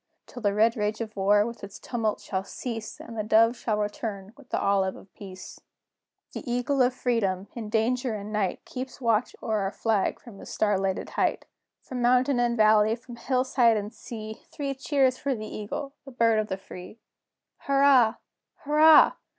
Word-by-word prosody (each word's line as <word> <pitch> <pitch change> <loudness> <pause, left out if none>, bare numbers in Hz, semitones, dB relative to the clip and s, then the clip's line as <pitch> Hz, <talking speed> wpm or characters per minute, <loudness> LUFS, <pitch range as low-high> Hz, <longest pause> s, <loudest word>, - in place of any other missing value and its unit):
Till 245 - -10
the 205 -2 +1
red 225 +2 +3
rage 210 -1 -2
of 220 -2 -5
war 205 +1 +3
with 235 -1 -7
its 200 0 -8
tumult 225 -3 -2
shall 190 -1 -3
cease, 225 +1 -6
And 230 - -9
the 215 - -1
dove 225 +3 +4
shall 220 -3 -2
return 205 -1 -4
with 285 -2 -18
the - - -1
olive 195 -1 +1
of 190 - -16
peace. 190 -2 -10 0.7
CHORUS. - - -6
The 250 - -5
Eagle 245 +3 0
of 250 0 +4
Freedom, 200 -7 -1
in 225 -3 -6
danger 235 +2 0
and 210 +1 -7
night, 200 -4 -1
Keeps 260 +2 -7
watch 230 -2 +1
o'er 220 -1 0
our 195 -1 -1
flag 220 -3 0
from 215 -5 -13
his - - -10
star 205 -3 +1
lighted 195 -1 -2
height. - - 0 0.4
From 255 -1 -5
mountain 250 +2 +3
and 240 0 +1
valley, 215 0 +4
from 240 0 -12
hill 255 +2 0
side 240 -4 +3
and 210 +1 -5
sea, 220 -2 -8
Three 280 -2 -3
cheers 270 -1 +1
for 275 -2 -1
the 215 -1 -6
Eagle, 275 +7 -6
the 275 - -11
Bird 230 -3 +2
of 215 - -1
the 190 - -3
Free! 185 +2 -11 0.6
Hurrah! 275 -5 +4 0.4
Hurrah! 305 +1 +6
225 Hz, 190 wpm, -26 LUFS, 210-250 Hz, 0.7 s, Hurrah